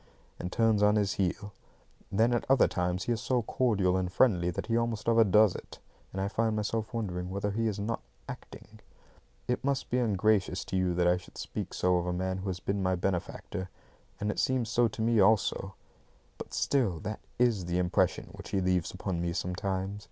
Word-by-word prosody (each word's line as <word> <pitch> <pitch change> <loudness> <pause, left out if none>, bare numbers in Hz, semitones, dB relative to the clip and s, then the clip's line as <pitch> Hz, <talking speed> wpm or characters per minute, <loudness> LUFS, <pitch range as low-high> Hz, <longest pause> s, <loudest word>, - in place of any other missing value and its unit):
and 90 - -4
turns 110 -1 +3
on 105 0 +5
his 100 -3 +1
heel. 100 +2 -2 0.6
Then 115 +4 +3
at 120 - +1
other 135 -1 +6
times 90 0 -1
he 120 - -2
is 115 -2 -1
so 125 -2 +1
cordial 105 -6 +1
and 90 -1 -1
friendly 90 -5 +3
that 85 - -3
he 115 - 0
almost 115 -2 -1
overdoes 110 -3 +5
it, - - -9 0.3
and 95 - -5
I 95 - 0
find 110 +1 0
myself 110 +2 -2
wondering 90 -6 -3
whether 100 +2 -2
he 115 +2 0
is 105 -2 -1
not 105 - -2 0.3
acting. - - -10 0.7
It 125 - -1
must 140 0 -1
seem 125 0 +2
ungracious 100 -3 +1
to - - -4
you 90 -2 +1
that 90 0 +2
I 90 +1 +4
should 90 - -13
speak - - -5
so 90 0 +2
of 90 0 -2
a 90 - 0
man 95 +1 -2
who 95 +1 -4
has 90 -1 -3
been 100 +1 -2
my 95 0 +1
benefactor; 90 0 -3 0.5
and 105 +1 0
it - - -4
seems 130 -4 +1
so 120 0 +3
to 110 0 -4
me 115 -1 +3
also, 95 -1 +2 0.6
but - - -8
still 115 - +1
that 105 0 -4 0.2
IS 115 -7 +2
the 90 0 -1
impression 90 -1 +1
which - - -10
he 100 - 0
leaves 90 -2 +1
upon 95 -2 -3
me 85 0 -1
sometimes. 95 +2 -2
100 Hz, 205 wpm, -30 LUFS, 90-115 Hz, 0.7 s, other